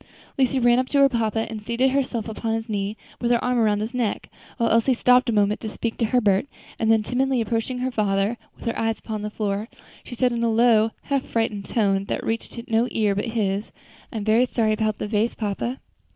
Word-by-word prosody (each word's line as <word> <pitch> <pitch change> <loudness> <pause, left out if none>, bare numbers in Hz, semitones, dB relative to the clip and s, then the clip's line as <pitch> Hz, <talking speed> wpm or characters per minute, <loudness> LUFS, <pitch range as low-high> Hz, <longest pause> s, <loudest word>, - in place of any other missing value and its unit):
Lucy 265 0 +2
ran 240 0 +4
up 255 - 0
to 285 - 0
her 275 0 +7
papa 225 -3 0
and 220 -1 -6
seated 240 +4 +1
herself 255 -5 -1
upon 225 +1 -2
his 225 0 -4
knee 205 0 -2 0.2
with 240 - 0
her 240 -1 +2
arm 250 -1 +1
around 210 -2 +2
his 220 +4 -4
neck; 240 -4 -2 0.3
while 230 -2 +1
Elsie 230 +3 +3
stopped 250 +1 +4
a - - +3
moment 210 -1 +2
to 220 - -4
speak 225 +1 -3
to 230 - 0
Herbert, 215 -1 +2 0.3
and 225 0 +3
then 220 -1 +4
timidly 260 +2 0
approaching 230 +3 -1
her 255 +1 -2
father, 205 0 0 0.2
with - - -13
her 230 - -1
eyes 225 0 0
upon 215 -1 -5
the 210 - -3
floor, 210 0 -2 0.4
said 250 +1 0
in 235 -1 -1
a 230 - +2
low, 225 -1 +4
half 275 -2 0
frightened 215 -3 -2
tone, 195 -3 +1
that - - -3
reached 225 +1 -3
no 230 0 +2
ear 210 -2 +1
but 205 +4 -2
his, 210 -3 -1 0.4
"I - - -5
am 210 - -3
very 225 +4 +3
sorry 220 -3 +1
about 215 -1 0
the - - -4
vase, 215 +2 0
papa." 225 +4 -3
225 Hz, 225 wpm, -23 LUFS, 215-245 Hz, 0.4 s, her